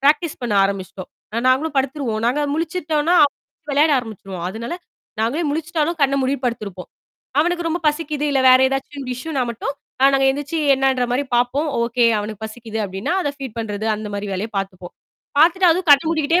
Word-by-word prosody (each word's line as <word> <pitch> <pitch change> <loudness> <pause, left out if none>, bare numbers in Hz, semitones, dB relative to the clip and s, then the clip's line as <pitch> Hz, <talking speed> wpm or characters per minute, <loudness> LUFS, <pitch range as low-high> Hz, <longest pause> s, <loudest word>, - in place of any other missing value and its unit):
Practice 300 +3 +2
பண்ண 240 -3 -1
ஆரம்பிச்சுட்டோம். 195 -1 -4 0.4
நாங்களும் 280 +4 +2
படுத்துருவோம். 265 -4 -1
நாங்க 255 +5 +1
முழிச்சிட்டோம்ன்னா 325 0 0
அவன் 285 - -1 0.4
வெளையாட 295 +2 +4
ஆரம்பிச்சிருவான். 195 -6 -7
அதுனால 230 - -5 0.5
நாங்களே 260 +10 0
முழிச்சிட்டாலும் 320 +2 -1
கண்ணை 275 0 +3
மூடிட்டு 265 0 -1
படுத்திருப்போம். 200 -6 -5 0.5
அவனுக்கு 345 +1 0
ரொம்ப 340 +2 -2
பசிக்குது, 300 -1 -2
இல்ல 275 -1 +2
வேற 255 0 +8
எதாச்சும் 270 +1 -4
இஷ்யுன்னா 270 +2 -3
மட்டும், 245 +4 -4 0.3
நா 270 - +7
நாங்க 270 0 +3
எந்திச்சு 290 +4 -3 0.2
என்னன்ற 265 -1 +1
மாரி 265 +3 0
பார்ப்போம். 255 +6 +1
"ஓகே, 235 +1 +1
அவனுக்குப் 210 +1 -5
பசிக்குது" 220 0 -7
அப்படீன்னா, 195 - -3
அத 290 - -1
ஃபீட் 265 -5 -7
பண்றது 215 -1 -3
அந்த 215 0 -6
மாரி 200 +1 -4
வேலைய 195 +4 -3
பாத்துப்போம். 185 -2 -6 0.5
பாத்துட்டு 350 +4 +5
அதுவும் 355 +2 0
கண்ணை 285 +2 +7
மூடிக்கிட்டே 330 +1 +2
270 Hz, 165 wpm, -20 LUFS, 225-305 Hz, 0.5 s, வேற